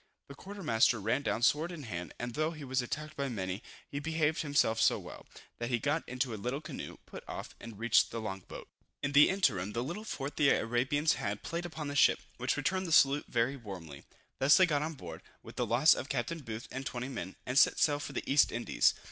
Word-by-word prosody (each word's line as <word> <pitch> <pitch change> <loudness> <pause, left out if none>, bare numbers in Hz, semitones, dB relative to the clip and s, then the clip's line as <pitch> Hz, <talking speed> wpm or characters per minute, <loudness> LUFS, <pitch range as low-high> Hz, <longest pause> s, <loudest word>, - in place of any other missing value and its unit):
The - - -8
quarter 195 +6 -9
master 115 -4 +3
ran 115 +7 0
down 120 -4 -1
sword 155 +7 +3
in 165 -4 -7
hand, 90 -7 -5
and 120 0 -5
though 155 +4 0
he 155 -2 -9
was 130 -1 0
attacked 150 +5 -5
by 140 -1 -2
many, 95 -4 -3 0.3
he 140 - -4
behaved 160 0 0
himself 140 -7 +2
so - - +4
well, - - -10 0.3
that 120 0 -3
he 120 - +2
got 150 +7 0
into 125 -1 -2
a 105 - -6
little 125 +5 -2
canoe, 155 -2 -7
put - - -10
off, - - -7
and 115 -3 -10
reached 115 +1 +3
the 115 - -5
long 100 -3 -4
boat. - - -9 0.4
In 140 - 0
the 145 +1 +7
interim, 105 - +1
the 120 - -1
little 175 +10 -5
fort 145 -9 -5
the 140 - +4
Arabians 130 +7 +2
had, 105 0 -3
played 170 +1 -3
upon 155 -3 -6
the 145 - -4
ship, - - +5 0.2
which - - -1
returned 190 0 0
the - - -5
salute 140 -1 +5
very 120 +3 0
warmly. 90 - -9 0.4
Thus 140 +3 +6
they 185 - +7
got 150 -5 0
on 160 +1 -3
board, 85 - -9 0.2
with - - -11
the - - -1
loss 130 +7 +6
of 135 - -5
Captain 165 0 -2
Booth 115 -5 -7
and 135 - -4
20 125 -1 -4
men, 120 -7 -6
and 125 +2 +3
set - - +5
sail 145 -2 +2
for - - -6
the - - -3
East 140 +1 +4
Indies. 120 +1 +2
135 Hz, 230 wpm, -32 LUFS, 115-150 Hz, 0.4 s, the